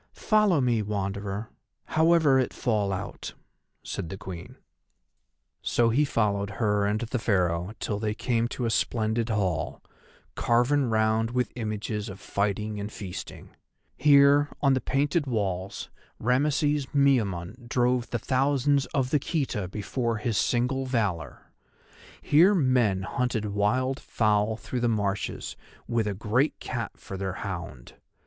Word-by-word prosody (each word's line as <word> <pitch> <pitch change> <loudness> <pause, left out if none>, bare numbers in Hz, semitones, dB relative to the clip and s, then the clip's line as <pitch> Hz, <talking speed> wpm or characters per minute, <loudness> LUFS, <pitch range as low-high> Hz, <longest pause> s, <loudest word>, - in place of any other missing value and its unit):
"Follow 210 -7 +3
me, 120 -4 +2
Wanderer, 100 +1 -3 0.3
however 160 -4 +4
it 130 - -1
fall 105 -5 0
out," 95 0 -5 0.5
said 80 - -5
the 95 - -6
Queen. 95 -4 -8 1.1
So 120 -1 +2
he 145 +6 +3
followed 100 -6 0
her 105 -3 +1
and 105 +1 0
the 120 +1 -2
Pharaoh 90 -3 0
till 105 -2 -2
they 105 -1 -1
came 120 -1 0
to 120 0 -4
a 115 - 0
splendid 110 +1 0
hall, 95 -7 -1 0.5
carven 125 +3 +2
round 110 0 +2
with 125 +1 -1
images 110 -1 -3
of 95 +1 -9
fighting 105 +1 -2
and 100 +1 -5
feasting. 95 -4 -8 0.4
Here, 145 +1 +5
on 135 -2 +3
the 130 - +1
painted 145 +3 0
walls, 100 -5 -3 0.3
Rameses 145 +3 +1
Miamun 120 -5 +1
drove 125 0 +1
the 120 - -1
thousands 140 +3 +1
of 130 -2 +1
the 150 - +3
Khita 130 - -2
before 115 +4 -2
his 110 +1 -2
single 125 +6 +1
valour; 105 - -2 0.7
here 175 +8 +5
men 125 - +2
hunted 115 +3 -1
wild 120 +7 0
fowl 105 -1 +1
through 110 +3 -4
the 120 - +1
marshes 100 -3 -2 0.3
with 115 -2 0
a 100 - -2
great 115 +8 0
cat 120 -4 -4
for 95 - -8
their 95 -1 -3
hound. 85 - -6
115 Hz, 135 wpm, -27 LUFS, 100-130 Hz, 1.1 s, Here